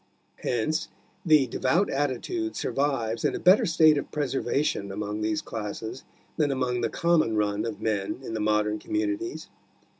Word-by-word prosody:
Hence 125 +7 -1 0.4
the 155 -5 +5
devout 135 - +1
attitude 145 - -2
survives 125 -6 -1
in - - +1
a - - -3
better 185 +3 +5
state 155 -3 +5
of - - -7
preservation 135 -7 -1
among 105 +1 -4
these 110 0 -1
classes 110 +3 -5 0.3
than 150 -3 +2
among 125 -2 0
the - - 0
common 160 -10 +2
run 105 0 0
of 110 -3 -6
men 105 -1 -1
in 115 - -6
the 110 - -2
modern 105 0 +1
communities. 325 +2 -3
130 Hz, 150 wpm, -27 LUFS, 110-155 Hz, 0.4 s, the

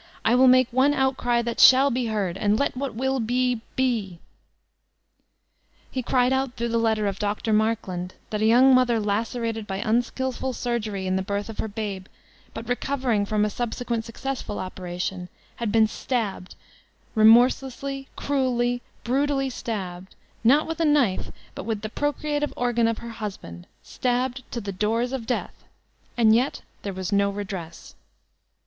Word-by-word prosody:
I 230 - +4
will 255 +1 +6
make 255 0 +6
one 265 +4 +3
outcry 255 -3 +1
that 235 0 -3
shall 270 +2 +7
be 245 -1 -1
heard, 200 -5 -1
and 205 +2 +1
let 280 - 0
what 270 -2 -4
will 265 +2 0
be, 245 +1 0
bet' 225 -9 0 1.7
He 260 - -2
cried 250 +1 +2
out 265 -1 -1
through 235 0 -2
the 230 0 +1
letter 220 -2 +1
of 195 -1 -2
Dr. 210 +1 -1
Markland, 210 -5 -1 0.2
that 210 -1 -2
a - - +3
young 255 +4 +6
mother 250 -3 +4
lacerated 225 +1 -2
by 190 - -3
unskilful 245 +4 -1
surgery 220 -6 -3
in 185 0 0
the - - 0
birth 200 +2 -3
of 225 - -8
her - - -1
babe, 200 -3 -5 0.4
but 225 0 -8
recovering 245 -4 0
from 210 0 +1
a - - 0
subsequent 240 0 -3
successful 235 -1 -5
operation, 180 0 -5 0.3
had 230 -3 -2
been 220 0 +5
stabbed, 215 -5 -3 0.6
remorselessly, 260 +4 +3
cruelly, 245 -3 0 0.2
bru 270 +4 +1
tally 270 -2 -1
stabbed, 190 -6 -5 0.3
not 275 +7 +5
with 325 0 -5
a - - +2
knife, 290 -11 +2 0.2
but - - -7
with 220 -2 -2
the 215 - -3
procreative 295 +3 -1
organ 240 -2 +2
of 230 -1 0
her 235 0 -7
husband, 190 - -7 0.2
stabbed 250 +1 -1
to 235 - -4
the 200 -3 -5
doors 225 +6 0
of 240 -4 -4
death, 250 - -3 0.5
and 220 -2 +5
yet 250 +5 +1 0.2
there 200 - -4
was 190 +1 -4
no 200 0 +3
redress! 195 -5 -7
230 Hz, 160 wpm, -25 LUFS, 205-255 Hz, 1.7 s, shall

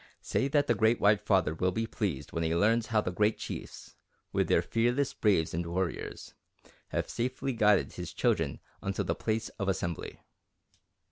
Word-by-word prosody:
Say 135 - 0
that 145 0 +2
the 120 - +3
Great 110 +2 +3
White 105 0 +4
Father 95 -7 +2
will 95 +3 0
be 115 +3 -1
pleased 90 - -3
when 85 - -2
he 80 +1 +1
learns 110 +5 +3
how 110 -2 +2
the 90 - -3
Great 105 +4 +2
Chiefs, - - -7 0.4
with - - +2
their - - +3
fearless 120 +4 +1
braves 95 -7 +2
and 85 +2 -1
warriors, 85 0 -4 0.5
have - - -2
safely 130 +2 -2
guided 105 -3 +3
his - - -6
children - - 0 0.2
unto 95 0 -1
the - - 0
place 110 0 -2
of 100 -1 0
assembly." 85 -3 -3
105 Hz, 175 wpm, -30 LUFS, 90-115 Hz, 0.5 s, White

